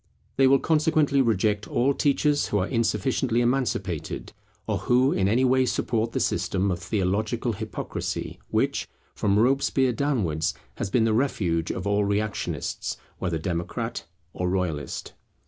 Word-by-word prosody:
They 135 Hz, 0 st, +5 dB
will 135 Hz, +1 st, +6 dB
consequently 155 Hz, -2 st, +2 dB
reject 105 Hz, -3 st, +1 dB
all 135 Hz, +3 st, +2 dB
teachers 145 Hz, +1 st, +2 dB
who 105 Hz, -, 0 dB
are 95 Hz, 0 st, 0 dB
insufficiently 115 Hz, +1 st, +1 dB
emancipated, 120 Hz, -, -1 dB, 0.3 s
or -, -, -1 dB
who 130 Hz, +3 st, +3 dB
in 95 Hz, -, +1 dB
any 120 Hz, +6 st, +3 dB
way 130 Hz, 0 st, +3 dB
support 115 Hz, -2 st, 0 dB
the -, -, 0 dB
system 95 Hz, +1 st, 0 dB
of 90 Hz, -, -2 dB
theological 100 Hz, +2 st, -1 dB
hypocrisy, -, -, -4 dB
which, -, -, 0 dB, 0.3 s
from 100 Hz, -1 st, +1 dB
Robespierre 130 Hz, +2 st, +3 dB
downwards, 100 Hz, -, 0 dB, 0.2 s
has -, -, -2 dB
been 115 Hz, +3 st, +3 dB
the 110 Hz, -1 st, +2 dB
refuge 90 Hz, -, 0 dB
of 90 Hz, -, -3 dB
all 100 Hz, 0 st, +2 dB
reactionists, 100 Hz, +1 st, -2 dB, 0.2 s
whether 85 Hz, -3 st, -1 dB
democrat 85 Hz, +1 st, -3 dB, 0.3 s
or 90 Hz, 0 st, -1 dB
royalist. 85 Hz, -7 st, -2 dB
110 Hz, 140 wpm, -25 LUFS, 95-130 Hz, 0.3 s, will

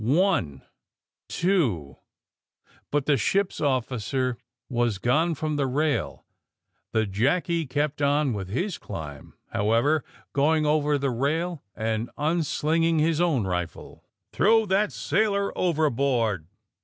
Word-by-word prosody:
*^One, 130 Hz, -, +1 dB, 0.7 s
two 135 Hz, -, 0 dB, 0.4 s
'* -, -, -35 dB
But 145 Hz, -2 st, +1 dB
the 145 Hz, -2 st, +3 dB
ship's 195 Hz, -, 0 dB
officer 130 Hz, -2 st, -1 dB, 0.3 s
was 120 Hz, -5 st, 0 dB
gone 155 Hz, -, +1 dB
from 155 Hz, 0 st, -2 dB
the 140 Hz, -2 st, +1 dB
rail. 150 Hz, +3 st, -1 dB, 0.7 s
The 110 Hz, 0 st, +1 dB
Jackie 145 Hz, -, 0 dB
kept 145 Hz, +2 st, -1 dB
on 145 Hz, -2 st, +2 dB
with 95 Hz, -3 st, -5 dB
his 175 Hz, -, -2 dB
climb, 75 Hz, -7 st, -8 dB, 0.2 s
however, 115 Hz, +9 st, +2 dB, 0.3 s
going 155 Hz, +2 st, +2 dB
over 150 Hz, -1 st, +2 dB
the 140 Hz, -1 st, -1 dB
rail 155 Hz, +6 st, -1 dB
and 110 Hz, +1 st, -2 dB
nnslinging 160 Hz, +1 st, +1 dB
his 160 Hz, +1 st, +2 dB
own 150 Hz, -, +2 dB
rifle. 90 Hz, -3 st, -5 dB, 0.3 s
*^ -, -, -59 dB
Throw 225 Hz, +2 st, +4 dB
that 200 Hz, +2 st, +1 dB
sailor 200 Hz, -2 st, 0 dB
overboard!'' 135 Hz, -, +1 dB
145 Hz, 120 wpm, -26 LUFS, 115-165 Hz, 0.7 s, Throw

